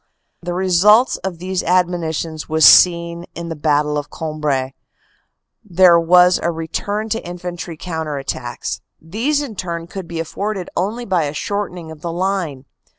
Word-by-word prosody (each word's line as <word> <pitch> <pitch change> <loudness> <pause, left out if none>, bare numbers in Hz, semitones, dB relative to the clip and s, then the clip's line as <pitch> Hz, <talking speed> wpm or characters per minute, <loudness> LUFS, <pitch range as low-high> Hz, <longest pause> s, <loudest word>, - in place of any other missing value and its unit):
The 175 0 -4
result 190 +6 +4
of 190 -3 -3
these 185 +2 -2
admonitions 165 -3 -1
was 160 0 +4
seen 170 -1 +5
in 170 0 -6
the 165 - -4
Battle 150 0 +1
of 145 - -8
Cambrai. 150 -4 -2 0.9
There 180 -3 +5
was 180 +2 +5
a 170 - 0
return 185 +6 -3
to 225 +2 -2
infantry 175 -1 -6
counter 160 -3 -4
attacks. 120 -3 -5 0.2
These, 240 - -1
in 240 -7 -7
turn, 170 -3 -4
could 185 0 -8
be 170 -1 -5
afforded 195 +3 -4
only 225 +6 -2
by 180 -6 +1
a 145 +1 -4
shortening 180 -2 -4
of 155 -2 -12
the 170 - -4
line. 175 -6 -2
170 Hz, 150 wpm, -19 LUFS, 160-185 Hz, 0.9 s, seen